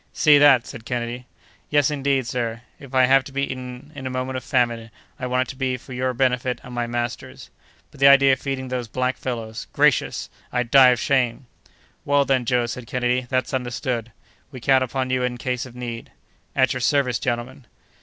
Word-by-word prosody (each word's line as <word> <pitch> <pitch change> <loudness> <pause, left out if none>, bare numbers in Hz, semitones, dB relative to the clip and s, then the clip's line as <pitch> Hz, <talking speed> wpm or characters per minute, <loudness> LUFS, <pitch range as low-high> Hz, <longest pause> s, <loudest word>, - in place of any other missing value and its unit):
"See 150 -2 +5
that!" 140 -5 +6
said 115 -5 -9
Kennedy. 120 +1 -4 0.4
"Yes, 145 -1 +3
indeed, 140 -2 0
sir; 115 -1 -3 0.2
if 135 -2 -10
I 130 -1 +6
have 135 +1 +4
to 140 - -9
be 140 +1 -1
eaten, 130 +2 -6
in 135 -2 -6
a - - -3
moment 130 +1 -3
of 130 - -4
famine, 120 -3 0 0.3
I 125 - -3
want 125 0 0
it - - -11
to - - -7
be 130 -1 -1
for 130 +2 -12
your 130 +1 -1
benefit 125 0 0
and 125 - -10
my 120 -1 -2
master's; 120 0 -5 0.4
but - - -17
the 140 - +6
idea 140 -1 +7
of 130 - -1
feeding 135 -2 -4
those 125 -2 -3
black 130 +3 -1
fellows—gracious! 115 -3 -1 0.2
I'd 125 -1 -2
die 135 -2 +8
of 125 -1 +2
shame!" 130 -1 0 0.6
"Well, 145 0 +2
then, 130 -3 +1
Joe," 120 0 +1
said 120 0 -6
Kennedy, 125 0 -1
"that's 130 0 -1
understood; 120 -2 -3 0.4
we 130 -2 -9
count 130 +2 +3
upon 130 0 -2
you 130 0 +1
in 125 -1 -2
case 125 +1 -3
of 120 - -15
need!" 120 -2 -6 0.4
"At 130 -3 +3
your 130 - -4
service, 130 -3 +1
gentlemen!" 125 +1 -4
125 Hz, 200 wpm, -22 LUFS, 120-135 Hz, 0.6 s, die